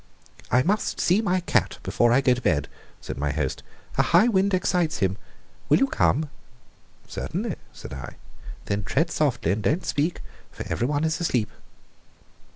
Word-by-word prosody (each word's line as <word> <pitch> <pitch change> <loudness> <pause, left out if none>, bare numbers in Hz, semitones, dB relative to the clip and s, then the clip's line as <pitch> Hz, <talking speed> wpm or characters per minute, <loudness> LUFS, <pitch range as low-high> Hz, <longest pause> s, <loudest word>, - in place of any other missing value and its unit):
"I 125 +2 +4
must 205 +7 0
see 185 +5 +3
my 185 -4 +1
cat - - +1
before 120 0 +2
I 130 +3 +5
go 130 -2 +4
to 125 - -4
bed," 75 -10 +1 0.3
said - - -6
my 75 0 0
host. - - -2 0.4
"A - - +8
high 225 - +5
wind 200 -3 +2
excites 180 -3 +1
him. 95 -2 +1 0.5
Will - - +6
you 270 - +4
come?" 155 - +1 0.8
"Certainly," - - -3
said - - -10
I. 70 0 -7 0.5
"Then 100 0 -1
tread 165 - 0
softly 125 - +1
and 105 +3 -1
don't 160 - 0
speak, 155 +4 -1 0.3
for - - -7
everyone 145 +5 0
is 160 0 0
asleep." 125 -10 0
145 Hz, 165 wpm, -25 LUFS, 110-180 Hz, 0.8 s, A